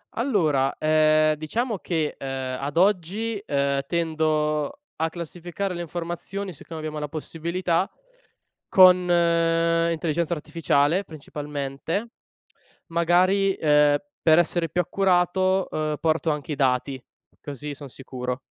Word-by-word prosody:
Allora, 160 Hz, -, +1 dB
ehm, 155 Hz, 0 st, +3 dB
diciamo 220 Hz, -, -2 dB
che, 160 Hz, -5 st, -2 dB
ehm, 130 Hz, -1 st, -4 dB
ad 140 Hz, +1 st, -4 dB
oggi, 200 Hz, +4 st, +1 dB
ehm, 140 Hz, -1 st, +1 dB
tendo 155 Hz, -, 0 dB, 0.2 s
a 160 Hz, +1 st, 0 dB
classificare 175 Hz, +3 st, -5 dB
le 175 Hz, -, -5 dB
informazioni, 175 Hz, +4 st, -5 dB
siccome 160 Hz, +1 st, -9 dB
abbiamo 155 Hz, -1 st, -5 dB
la 150 Hz, -, -3 dB
possibilità 170 Hz, +4 st, -2 dB, 0.8 s
con 185 Hz, -1 st, +7 dB
l'intelligenza 165 Hz, -1 st, +1 dB
artificiale 155 Hz, +2 st, +1 dB
principalmente, 150 Hz, +6 st, -5 dB, 0.8 s
magari, 185 Hz, +3 st, +3 dB
ehm, 150 Hz, -1 st, +4 dB, 0.2 s
per 160 Hz, 0 st, +5 dB
essere 170 Hz, 0 st, 0 dB
più 180 Hz, -, +1 dB
accurato, 185 Hz, +1 st, +1 dB
ehm, 155 Hz, -1 st, -2 dB
porto 160 Hz, 0 st, +1 dB
anche 150 Hz, 0 st, -3 dB
i -, -, -3 dB
dati, 130 Hz, -1 st, 0 dB, 0.4 s
così 145 Hz, +1 st, -6 dB
son 140 Hz, -1 st, -10 dB
sicuro. 125 Hz, 0 st, -5 dB
160 Hz, 115 wpm, -24 LUFS, 150-180 Hz, 0.8 s, con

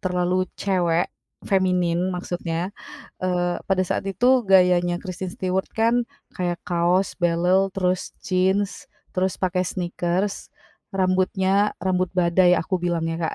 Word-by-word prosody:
terlalu 180 Hz, -1 st, 0 dB
cewek 175 Hz, -3 st, +1 dB, 0.4 s
feminin 180 Hz, -2 st, +1 dB
maksudnya. 175 Hz, 0 st, -3 dB, 0.5 s
Eee, 175 Hz, -1 st, 0 dB
pada 190 Hz, -1 st, +2 dB
saat 180 Hz, -, -2 dB
itu 250 Hz, +7 st, +3 dB
gayanya 180 Hz, -2 st, +4 dB
Kristen 185 Hz, -1 st, -5 dB
Stewart 185 Hz, 0 st, -2 dB
kan 230 Hz, +2 st, +2 dB, 0.3 s
kayak 175 Hz, -1 st, -1 dB
kaos, 180 Hz, +2 st, +1 dB
belel, 175 Hz, +3 st, +3 dB
terus 185 Hz, -1 st, -1 dB
Jeans, 190 Hz, +2 st, 0 dB, 0.2 s
terus 185 Hz, 0 st, 0 dB
pakai 185 Hz, -1 st, 0 dB
sneakers, 180 Hz, +2 st, -2 dB, 0.4 s
rambutnya 190 Hz, +2 st, +1 dB
rambut 185 Hz, -1 st, +1 dB
badai 180 Hz, 0 st, +4 dB
aku 185 Hz, +2 st, -1 dB
bilangnya, 165 Hz, -1 st, -1 dB
Kak. -, -, -4 dB
185 Hz, 115 wpm, -23 LUFS, 175-190 Hz, 0.5 s, gayanya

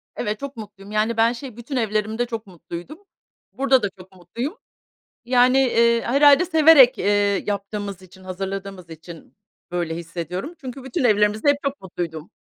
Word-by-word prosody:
Evet, 210 Hz, 0 st, -3 dB
çok 280 Hz, -2 st, -7 dB
mutluyum. 205 Hz, -2 st, -11 dB
Yani, 215 Hz, +2 st, 0 dB
ben 230 Hz, +1 st, +3 dB
şey, 245 Hz, -2 st, -9 dB
bütün 240 Hz, +4 st, -7 dB
evlerimde 220 Hz, 0 st, -1 dB
çok 230 Hz, -3 st, -6 dB
mutluydum. 175 Hz, -, -9 dB, 0.5 s
Burada 265 Hz, -2 st, +2 dB
da 205 Hz, -, 0 dB
çok 185 Hz, +1 st, -14 dB
mutluyum. 235 Hz, -, -6 dB, 0.7 s
Yani, 250 Hz, +1 st, +4 dB
eee, 235 Hz, -3 st, +3 dB
herhâlde 285 Hz, +5 st, +5 dB
severek, 315 Hz, -6 st, +6 dB
eee, 205 Hz, -1 st, +1 dB
yaptığımız 200 Hz, -1 st, -4 dB
için, 185 Hz, +1 st, -17 dB
hazırladığımız 190 Hz, -1 st, -6 dB
için 165 Hz, +1 st, -12 dB, 0.3 s
böyle 170 Hz, -2 st, -2 dB
hissediyorum. 170 Hz, -, -6 dB
Çünkü 260 Hz, -1 st, -8 dB
bütün 265 Hz, +2 st, -3 dB
evlerimizde 210 Hz, +1 st, +2 dB
hep 285 Hz, -, +5 dB
çok 280 Hz, 0 st, -3 dB
mutluydum. 170 Hz, -2 st, -6 dB
215 Hz, 150 wpm, -22 LUFS, 190-255 Hz, 0.7 s, severek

